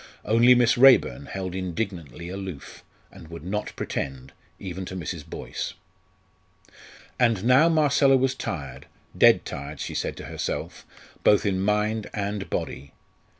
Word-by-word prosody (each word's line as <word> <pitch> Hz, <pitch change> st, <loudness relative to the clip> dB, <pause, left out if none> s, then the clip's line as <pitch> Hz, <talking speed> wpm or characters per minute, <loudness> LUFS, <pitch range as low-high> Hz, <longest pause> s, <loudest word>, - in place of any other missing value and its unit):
Only 115 Hz, +3 st, +6 dB
Miss 125 Hz, +1 st, +3 dB
Raeburn 120 Hz, -, +5 dB
held 95 Hz, -2 st, -5 dB
indignantly 90 Hz, -, -5 dB
aloof, 95 Hz, -5 st, -8 dB, 0.3 s
and 80 Hz, -, -13 dB
would 85 Hz, -1 st, -9 dB
not 105 Hz, +4 st, -3 dB
pretend, 65 Hz, -1 st, -5 dB, 0.2 s
even 95 Hz, -1 st, -6 dB
to 95 Hz, -, -7 dB
Mrs. 85 Hz, -2 st, -5 dB
Boyce. -, -, -6 dB, 1.4 s
And 115 Hz, -6 st, +2 dB
now 130 Hz, +7 st, +6 dB
Marcella 140 Hz, -4 st, +4 dB
was 130 Hz, 0 st, +1 dB
tired 70 Hz, -, -6 dB, 0.3 s
dead -, -, +5 dB
tired, 70 Hz, +1 st, -7 dB
she -, -, -5 dB
said -, -, -3 dB
to -, -, -8 dB
herself, -, -, -5 dB, 0.4 s
both 105 Hz, -, +4 dB
in 95 Hz, -2 st, 0 dB
mind 105 Hz, +1 st, 0 dB
and 100 Hz, -1 st, -3 dB
body. 70 Hz, +2 st, -4 dB
95 Hz, 135 wpm, -25 LUFS, 85-115 Hz, 1.4 s, Only